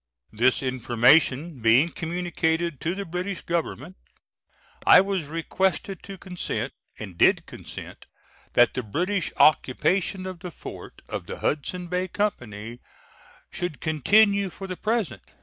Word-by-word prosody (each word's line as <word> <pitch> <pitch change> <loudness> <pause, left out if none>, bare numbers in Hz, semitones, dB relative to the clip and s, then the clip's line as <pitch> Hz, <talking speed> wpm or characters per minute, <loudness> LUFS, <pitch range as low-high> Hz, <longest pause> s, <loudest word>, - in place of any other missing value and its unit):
This 120 +5 +2
information 130 +4 +3
being 120 +8 +5
communicated 170 -2 -2
to 170 +2 -1
the 200 0 -4
British 180 +2 -4
Government, 170 0 -3 0.9
I - - +8
was 190 -5 0
requested 185 +4 -1
to 195 -1 -9
consent, 180 -1 -4 0.2
and 95 -6 -8
did - - +4
consent, - - -10 0.5
that 120 - +5
the 130 - -2
British 175 - -1
occupation 180 +7 +3
of 185 -2 -6
the 180 0 -6
fort - - -10
of - - -5
the - - -6
Hudsons 175 +4 -2
Bay 180 +1 0
Company 120 - -3 0.7
should 175 -5 -4
continue 200 - +3
for 195 - -9
the 185 -1 -5
present. 215 -2 -1
170 Hz, 130 wpm, -25 LUFS, 130-185 Hz, 0.9 s, I